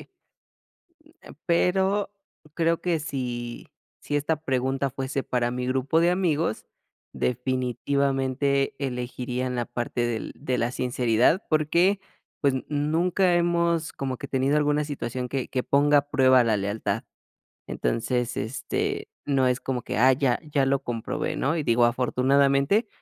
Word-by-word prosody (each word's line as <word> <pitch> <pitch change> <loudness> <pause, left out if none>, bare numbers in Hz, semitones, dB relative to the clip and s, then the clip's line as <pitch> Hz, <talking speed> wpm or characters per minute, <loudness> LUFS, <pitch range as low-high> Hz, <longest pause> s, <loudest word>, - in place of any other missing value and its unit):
eh, - - -15 1.4
pero 190 +4 +2 0.5
creo 165 0 +1
que 170 -3 0
si 125 -5 -5 0.3
si 145 - -3
esta 150 +2 0
pregunta 135 +1 0
fuese 135 +1 -3
para 120 -1 -1
mi 125 0 -3
grupo 130 +4 +1
de 170 +1 +4
amigos, 165 - 0 0.5
definitivamente 135 +2 0
elegiría 125 -1 -3
en 125 - -3
la 120 -1 -1
parte 120 0 -3
del 115 -2 -4
de 130 -3 -2
la 120 0 0
sinceridad, 125 - +2
porque, 170 +6 +3 0.4
pues, 140 -2 +3 0.2
nunca 170 +5 +1
hemos 170 -1 +1
como 130 -2 -4
que 140 - -7
tenido 135 +2 +1
alguna 150 0 +2
situación 125 -3 -4
que 135 -1 -3
que 130 - -1
ponga 145 +1 +4
a 145 - -9
prueba 130 -3 +5
la 110 -2 +2
lealtad. 100 +2 -2 0.6
Entonces, 120 +1 -1
este, 410 - -3 0.2
no 135 -2 +2
es 125 0 +1
como 125 -2 -3
que, - - -4
ah, 130 +4 +6
ya 130 -1 +1
ya 145 -3 0
lo 135 0 +2
comprobé, 115 -2 -3
¿no? 155 +5 0
Y 155 - -1
digo 120 -3 +3
afortunadamente, 140 - +2
135 Hz, 140 wpm, -25 LUFS, 125-155 Hz, 1.4 s, ah